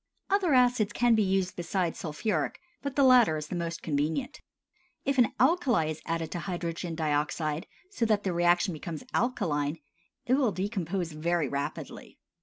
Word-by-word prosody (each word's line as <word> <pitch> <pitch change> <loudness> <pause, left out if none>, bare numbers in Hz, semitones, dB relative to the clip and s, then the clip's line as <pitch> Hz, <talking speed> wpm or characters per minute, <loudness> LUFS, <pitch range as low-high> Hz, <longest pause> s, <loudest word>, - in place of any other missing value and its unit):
Other 375 -8 +3
acids 245 -5 +3
can 240 -1 +3
be 220 - +4
used 190 -2 0
besides 175 0 -2
sulphuric, 155 +1 -2 0.2
but 280 -1 -4
the 280 - +4
latter 245 -11 +6
is 155 0 -6
the - - -3
most 170 -1 -4
convenient. 160 - -2 0.6
If 275 -1 +1
an 235 - +4
alkali 260 - +3
is 155 - -7
added 165 -1 -2
to 175 - -3
hydrogen 170 -2 -4
dioxide 155 +1 -1 0.2
so 235 - 0
that 210 -2 +2
the 185 - -1
reaction 175 +1 +3
becomes 160 +3 -6
alkaline, 150 - 0 0.5
it 250 - +1
will 260 -5 +3
decompose 185 -3 -2
very 160 0 0
rapidly. 140 +1 -5
175 Hz, 160 wpm, -29 LUFS, 160-240 Hz, 0.6 s, latter